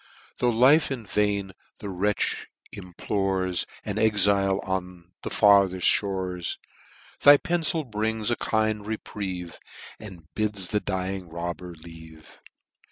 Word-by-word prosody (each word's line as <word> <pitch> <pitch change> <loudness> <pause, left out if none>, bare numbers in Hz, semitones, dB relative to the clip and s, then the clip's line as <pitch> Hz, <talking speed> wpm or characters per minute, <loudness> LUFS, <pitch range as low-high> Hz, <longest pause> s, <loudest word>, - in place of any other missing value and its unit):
Tho* 125 - +2
life 130 +7 +5
in 125 -5 -5
vain 100 -1 0 0.3
the 105 - -8
wretch 100 +3 -1 0.2
implores, 95 0 -2 0.2
An - - -3
exile 100 -2 +3
on 90 -2 -5
the - - -5
fartheft 100 -3 +4 0.2
fhores, 95 -3 -4 0.6
Thy 145 0 +9
pencil 165 0 0
brings 110 -1 -1
a - - +2
kind 110 -2 -1
reprieve, 95 -5 -5 0.4
And 90 -7 -11
bids 105 -4 -2
the 105 - +1
dying 95 -2 -4
robber 85 +1 -6
live. 80 -1 -14
100 Hz, 115 wpm, -25 LUFS, 90-110 Hz, 0.6 s, Thy